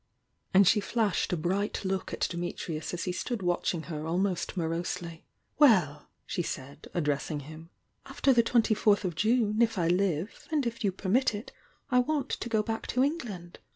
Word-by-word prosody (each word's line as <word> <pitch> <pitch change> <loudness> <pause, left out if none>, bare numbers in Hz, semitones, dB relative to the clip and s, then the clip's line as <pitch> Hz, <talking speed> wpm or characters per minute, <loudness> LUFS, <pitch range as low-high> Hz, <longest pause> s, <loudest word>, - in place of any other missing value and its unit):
And 195 0 +6
she 210 - +5
flashed 215 -1 0
a 180 - +1
bright 195 +5 -1
look 190 0 -2
at - - -6
Dimi 175 0 -2
trius 155 -2 -4
as 175 - -3
he 180 - -1
stood 210 +3 -3
watching 175 -1 0
her 155 -1 -5
almost 180 +2 -1
morosely. 170 0 -3 0.3
"Well!" 185 - +4 0.2
she 185 - -2
said, 140 -2 -6
addressing 150 -2 -1
him, 155 +3 -11 0.4
"after 275 - +2
the 240 - +5
twenty 230 -1 +3
lourtii 210 -1 +3
of 180 -2 -1
June, 215 +3 +2
if 225 -2 +2
I 170 -2 +1
live, 180 +1 0
and 300 -4 +1
if 235 0 -3
you 200 - +2
permit 205 +6 +1
it, 205 - -7 0.4
I 250 - +5
want 285 +2 0
to 240 - -3
go 220 -2 +2
back 225 +1 -4
to 250 - +2
England. 225 - -4
190 Hz, 185 wpm, -29 LUFS, 170-225 Hz, 0.4 s, And